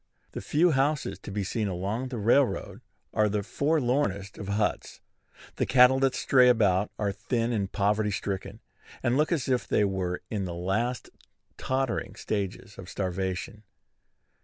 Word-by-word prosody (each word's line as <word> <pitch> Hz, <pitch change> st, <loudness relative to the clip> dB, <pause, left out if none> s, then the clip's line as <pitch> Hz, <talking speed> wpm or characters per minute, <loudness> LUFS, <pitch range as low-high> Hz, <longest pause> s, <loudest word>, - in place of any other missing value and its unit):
The -, -, -6 dB
few 170 Hz, +4 st, +3 dB
houses 140 Hz, +1 st, 0 dB
to -, -, -9 dB
be 100 Hz, 0 st, -2 dB
seen 105 Hz, +2 st, -2 dB
along 100 Hz, +7 st, -2 dB
the 125 Hz, -2 st, -5 dB
railroad 120 Hz, +5 st, +1 dB, 0.3 s
are 105 Hz, 0 st, +3 dB
the 105 Hz, 0 st, -1 dB
forlornest 125 Hz, -7 st, 0 dB
of 100 Hz, -, -6 dB
huts. 105 Hz, +1 st, -1 dB, 0.6 s
The -, -, 0 dB
cattle 130 Hz, 0 st, +6 dB
that 135 Hz, -1 st, +2 dB
stray 125 Hz, -1 st, +5 dB
about 105 Hz, -4 st, +3 dB
are 100 Hz, -1 st, 0 dB
thin 115 Hz, +4 st, -1 dB
and 100 Hz, -4 st, -1 dB
poverty 105 Hz, +1 st, +1 dB
stricken, 100 Hz, 0 st, -4 dB, 0.4 s
and 120 Hz, -, +2 dB
look 150 Hz, +4 st, +2 dB
as 150 Hz, -8 st, 0 dB
if 125 Hz, -2 st, 0 dB
they 105 Hz, -, +2 dB
were 95 Hz, -2 st, -2 dB
in 100 Hz, -4 st, -2 dB
the 85 Hz, -2 st, -5 dB
last 110 Hz, +8 st, -2 dB, 0.5 s
tottering 130 Hz, -2 st, -2 dB
stages 100 Hz, -1 st, -4 dB
of 95 Hz, 0 st, -9 dB
starvation. 95 Hz, +3 st, -3 dB
105 Hz, 155 wpm, -27 LUFS, 100-125 Hz, 0.6 s, cattle